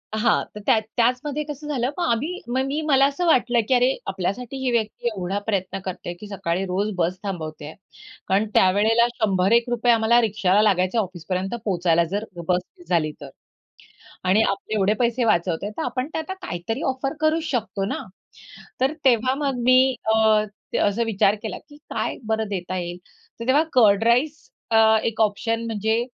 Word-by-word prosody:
हां, 220 +1 +2
तर - - -6
त्या 220 - +4 0.2
त्याचमध्ये 255 +5 +1
कसं 295 0 -8
झालं 255 -4 -1
मग 355 - -1
आम्ही 305 +11 -2
मग 255 +2 0
मी 285 +3 -2
मला 275 -1 +5
असं 285 +6 -1
वाटलं 245 -6 +3
की 260 - +2
"अरे 250 +1 +4 0.2
आपल्यासाठी 200 +7 -3
ही 265 -2 -1
व्यक्ती 230 0 -1
एवढा 195 -3 -2
प्रयत्न 195 -2 -1
करतोय 180 -2 -5
की 210 - -9
सकाळी 195 -2 -2
रोज 195 +3 -1
बस 180 +1 0
थांबवतेय," 155 -5 -6 0.5
कारण 195 +3 +2
त्यावेळेला 215 +5 +4
शंभर 195 -4 +1
एक 235 +1 +3
रुपये 240 0 +2
आम्हाला 230 +1 +4
रिक्षाला 205 -2 +2
लागायचे 185 0 +2
ऑफिसपर्यंत 185 +1 -2
पोहचायला 175 -4 +2
जर 205 +2 -2 0.2
बस 180 0 +2 0.2
मीस 175 - -17
झाली 160 -4 +1
तर 140 - -8 0.9
आणि 190 +4 +3
आपले 200 +2 -3
एवढे 205 0 +2
पैसे 240 0 +1
वाचवतोय 180 -2 0
तर - - -2
आपण 255 +1 -2
त्यांना 320 +4 -3
काहीतरी 225 - -4
ऑफर 270 +1 -3
करूचं 315 +1 +1
शकतो 205 -3 -4
ना. - - -3 0.8
तर 270 +4 +2
तेव्हा 255 0 +4
मग 275 -2 -2
मी 255 +1 +6 0.3
अ, 220 -1 +4 0.3
त - - -2
असा 205 +3 +1
विचार 205 -2 +2
केला 220 - -4
की 290 - -14
"काय - - -2
बरं 220 0 0
देता 185 -2 -4
येईल?" 175 0 -4 0.4
तर 230 - -5
तेव्हा 285 +4 +4
कर्ड 215 -4 +5
राईस 260 +7 +1 0.2
अ, 220 0 +5
एक 225 -1 -1
ऑप्शन 225 +2 0
म्हणजे 225 +1 0
220 Hz, 175 wpm, -23 LUFS, 190-250 Hz, 0.9 s, मी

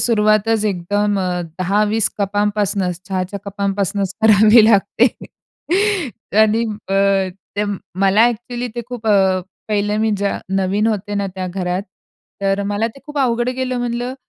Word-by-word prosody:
सुरुवातच 215 -1 +3
एकदम 205 +1 0
अ, 180 -1 -1 0.2
10-20 210 +4 +1
कपांपासनच 200 -3 0
चहाच्या 190 +1 -3
कपांपासनच 200 -1 -2
करावी 215 +1 +7
लागते. 215 +2 +4 1.3
आणि 220 +2 +3 0.3
अ, 195 -1 +2 0.3
ते 210 - +1 0.4
मला 195 +4 +5
एक्चुअली 240 +1 -4
ते 240 - -3
खूप 240 -3 -7
अ, 190 -3 +3 0.3
पहिलं 210 0 0
मी 220 0 +1
ज 200 - -2 0.3
नवीन 195 +3 +1
होते 205 -2 -2
ना 200 -1 -1
त्या 185 -1 -4
घरात 180 0 -2 0.6
तर 195 0 0
मला 205 +2 -1
ते 230 +4 -9
खूप 295 0 -5
अवघड 240 -2 +1
गेलं 255 0 -2
म्हणलं, 245 +1 -3
205 Hz, 135 wpm, -18 LUFS, 195-225 Hz, 1.3 s, करावी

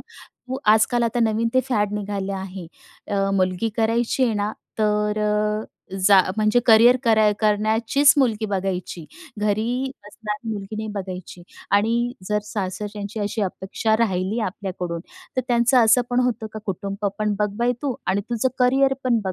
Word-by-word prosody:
तू 255 +1 -10 0.2
आजकाल 235 +2 +3
आता 235 +1 0
नवीन 225 0 +1
ते 260 - +5
फॅड 210 -5 0
निघाले 200 -1 -3
आहे. 190 -2 -6 0.4
अ, 195 -1 0
मुलगी 185 +3 +1
करायची 230 +3 +1
आहे 230 - 0
ना, 205 +1 -1 0.3
तर 210 0 +1 0.9
जा 200 -2 +8 0.2
म्हणजे 215 +2 +3
करियर 235 +2 +7
कराय 220 -2 +4
करण्याचीच 220 +6 +3
मुलगी 225 -5 +1
बघायची. 185 -4 -3 0.3
घरी 225 +6 0 0.2
असणारी 210 +1 -5
मुलगी 205 0 -6
नाही 220 0 -4
बघायची 180 -2 -8 0.3
आणि 235 +4 +1 0.2
जर 210 0 +1
सासरच्यांची 205 +1 -5
अशी 210 +1 -2
अपेक्षा 200 +3 -1
राहिली 200 0 0
आपल्याकडून, 180 -3 -5 0.4
तर - - +3
त्यांचं 240 0 +4
असं 225 +3 +5
पण 245 0 +2
होतं 235 -2 -1
का 220 - -6
कुटुंब 200 +1 -3
पण 210 -1 0
बघ 210 0 +1
बाई 240 +1 +2
तू 275 -3 -1
आणि 190 +2 +1
तुझं 240 +2 +1
करिअर 270 +2 +3
पण 240 -3 +2
बघ, 190 - -2
215 Hz, 150 wpm, -22 LUFS, 200-235 Hz, 0.9 s, जा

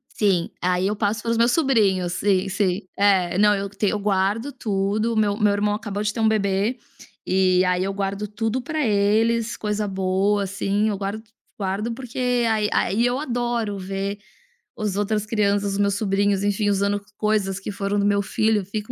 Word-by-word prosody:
Sim, 190 -5 +1
aí 180 +1 +1
eu 210 - -1
passo 210 0 -1
para 230 - -2
os 230 - +1
meus 235 +1 +4
sobrinhos, 210 - +2
sim, 195 0 +1
sim. 190 -1 0 0.2
É, 190 -3 +3
não, 210 0 +5
eu 200 0 -3
tenho 205 0 -1
eu 210 - -1
guardo 205 +6 0
tudo, 215 -2 -1
meu 210 -1 +1
meu 210 -2 +3
irmão 205 0 +1
acabou 205 -1 -4
de 210 0 -1
ter 230 - -5
um 220 - +3
bebê, 205 +2 +1 0.5
e 185 -1 +3
aí 180 0 +1
eu 195 +1 -2
guardo 200 +1 -3
tudo 225 +4 -2
para 305 +2 -2
eles, 220 +3 +2
coisa 210 0 -2
boa, 195 +2 +1
assim, 200 +2 0
eu 205 - -2
guardo 205 +3 -4 0.3
guardo, 205 +3 -2
porque 250 +1 -7 0.3
aí 215 -1 +1
aí 225 +5 +1
eu 245 +1 +1
adoro 240 -6 -2
ver 195 +1 -4 0.6
os 210 -3 -2
outras 210 0 0
crianças, 205 -2 0
os - - -2
meus 200 -1 +1
sobrinhos, 200 -1 +1
enfim, 205 +1 +1
usando 200 +1 +1 0.2
coisas 205 -3 0
que 200 - -5
foram 200 0 -2
do 200 - +1
meu 205 0 +2
filho, 215 0 0
fica 210 +4 -5
205 Hz, 185 wpm, -23 LUFS, 195-215 Hz, 0.6 s, não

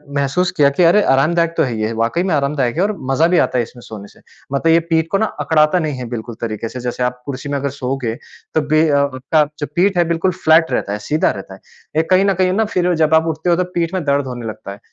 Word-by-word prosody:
महसूस 140 +6 +1
किया 145 -2 +5
कि 140 +6 +1
अरे, 175 +5 +5
आरामदायक 165 +5 +2
तो - - +3
है 125 -5 -2
ये, 110 +1 -1
वाक़ई 115 +10 0
में 185 -3 0
आरामदायक 140 -3 0
है, - - +2
और 210 - +1 0.2
मज़ा 160 +5 +3
भी 180 0 +2
आता - - -3
है 120 - +2
इसमें 120 +1 -12
सोने 105 -3 -10
से। - - -21 0.3
मतलब 160 +4 +2
ये 165 - +5
पीठ 160 0 +2
को 195 - +2
ना 220 - +1
अकड़ाता 155 +2 +2
नहीं 155 -5 -3
है 125 - -5
बिल्कुल 120 -1 -6
तरीके 115 0 -4
से, 125 - -7
जैसे 125 0 -3
आप 125 0 -2
कुर्सी 140 +1 -5
में 145 - -1
अगर 140 +1 -2
सोओगे, 125 -3 -2 0.4
तब 150 -2 +1
भी 155 +1 +4
अ - - +1
आपका 140 +2 +1 0.2
जो 145 - -2
पीठ 190 +2 +2
है, 175 - +5
बिल्कुल 170 +3 +1
फ्लैट 160 +1 +4
रहता 100 - -1
है, 105 - -4
सीधा 150 +9 0
रहता 100 -1 -9
है। 95 - -13 0.4
ये 160 - +4
कहीं 185 +1 +5
न 195 - +3
कहीं 185 0 +1
ना, 220 +3 +1
फिर 180 -4 0
जब 155 +1 +2
आप 160 +1 +3
उठते 160 +2 -2
हो 170 - +4
तो 180 - +1
पीठ 170 0 -1
में 185 - -2
दर्द 140 0 +1
होने 120 -2 -6
लगता 110 -2 -7
है। 100 - -10
150 Hz, 275 wpm, -18 LUFS, 125-170 Hz, 0.4 s, किया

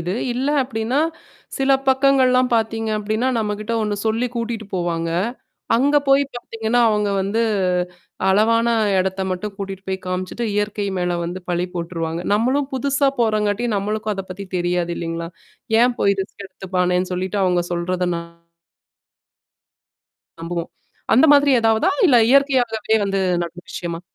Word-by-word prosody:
இது. 175 +2 -3 0.2
இல்ல 260 +4 -1
அப்பிடின்னா, 240 +2 -1 0.6
சில 270 0 +1 0.2
பக்கங்கள்லாம் 260 -1 +4
பாத்தீங்க 225 0 0
அப்பிடின்னா, 215 +4 -1
நம்மக்கிட்ட 210 +1 -3
ஒண்ணு 210 -1 -1
சொல்லி 225 +3 +1
கூட்டிட்டு 230 -2 -3
போவாங்க. 170 -2 -1 0.7
அங்க 285 +4 +3
போய் 275 +1 +5
பாத்தீங்கன்னா 230 0 -1
அவுங்க 210 -1 +1
வந்து 200 +4 -1 0.9
அளவான 230 +4 +3 0.3
இடத்த 190 +1 -1
மட்டும் 195 +3 -4
கூட்டிட்டு 195 -1 -6
போய் 190 0 -3
காமிச்சுட்டு, 185 +6 -3
இயற்கை 205 0 -1
மேல 180 -1 -1
வந்து 175 +2 -5
பழி 175 +1 0
போட்டுருவாங்க. 165 -1 -3
நம்மளும் 265 +6 +1
புதுசா 280 +1 +1
போறங்காட்டியும் 215 0 +1
நம்மளுக்கும் 210 +1 -2
அதப் 190 -1 -7
பத்தி 195 +2 -7
தெரியாது 175 0 0
இல்லீங்களா! 165 0 -4 0.5
ஏன் 245 0 +2
போய் 200 0 +3
ரிஸ்க் 200 +1 -11
எடுத்துப்பானேன்னு 180 -1 -1
சொல்லிட்டு 185 +2 -2
அவுங்க 180 -1 +1
சொல்றத 180 +1 -1
ந - - -3 2.2
நம்புவோம். 170 0 -4 0.4
அந்த 255 - +6
மாதிரி 285 0 +5
ஏதாவதா? 225 +7 +3 0.2
இல்ல 255 -6 +5
இயற்கையாகவே 245 -6 +3
வந்து 195 -1 -1 0.2
நடந்த 175 +1 -9
விஷயமா? 170 -1 -4
210 Hz, 130 wpm, -21 LUFS, 180-235 Hz, 2.2 s, அந்த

